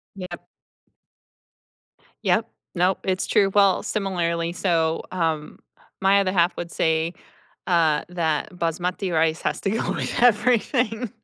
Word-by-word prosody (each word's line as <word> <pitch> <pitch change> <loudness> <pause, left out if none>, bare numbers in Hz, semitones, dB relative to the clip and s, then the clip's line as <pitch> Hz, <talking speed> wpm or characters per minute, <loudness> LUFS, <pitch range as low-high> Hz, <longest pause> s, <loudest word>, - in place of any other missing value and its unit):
Yep. 180 -2 -8 1.8
Yep, - - +2 0.3
nope, 180 +2 +2
it's 185 0 -1
true, 195 -1 +3
well, 200 -2 +4
similarly, 170 -5 -1
so, 165 -3 0
um, 160 -4 -2 0.4
my 195 +1 +5
other 190 -2 +1
half 175 -1 +2
would 170 -1 -5
say, 160 +1 0 0.5
uh, 160 -4 +2
that 160 -4 -1
Basmati 180 +2 -2
rice 160 0 +1
has - - -1
to 195 - -1
go 225 - -1
with - - -2
everything. 240 0 +2
180 Hz, 125 wpm, -23 LUFS, 165-195 Hz, 1.8 s, my